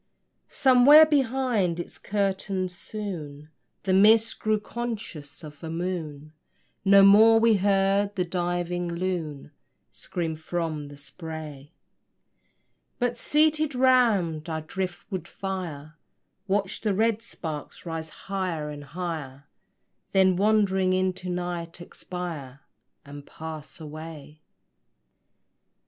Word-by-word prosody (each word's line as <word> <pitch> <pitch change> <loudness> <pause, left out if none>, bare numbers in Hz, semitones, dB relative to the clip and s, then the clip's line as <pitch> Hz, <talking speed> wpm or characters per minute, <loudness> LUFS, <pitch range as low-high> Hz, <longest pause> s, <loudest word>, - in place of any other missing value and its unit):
Somewhere 275 +3 +7
behind 255 - +1
its 175 - -7
curtain, 195 -2 -1
soon 170 -6 -7 0.3
The 185 - +1
mist 220 +4 +5
grew 215 -1 +1
conscious 215 -11 -6
of 150 -1 -11
a 160 - -5
moon: 160 -4 -4 0.5
No 195 0 +7
more 220 +3 +7
we 225 -2 +4
heard 200 +1 +2
the 180 -2 0
diving 175 0 -2
loon 170 -5 -3 0.4
Scream 165 -3 -4
from 160 -2 -3
the 145 0 -12
spray; 150 -2 -8 1.3
But 245 -1 0
seated 305 +2 +2
round 220 -12 +3
our 160 -1 -2
drift 180 +2 -5
wood 185 -4 -4
fire 165 -5 -6 0.5
Watched 195 0 -1
the 210 -3 0
red 225 +1 +1
sparks 160 -11 -7
rise 165 -1 -4
high 180 -5 -4
and 145 -1 -8
higher, 145 -4 -6 0.7
Then, 190 -1 +4
wandering 190 -2 +2
into 185 -1 -1
night, 175 -1 -4
expire 165 -6 -7 0.4
And 145 0 -10
pass 160 -1 -8
away. 155 -1 -9
180 Hz, 105 wpm, -26 LUFS, 160-205 Hz, 1.3 s, Somewhere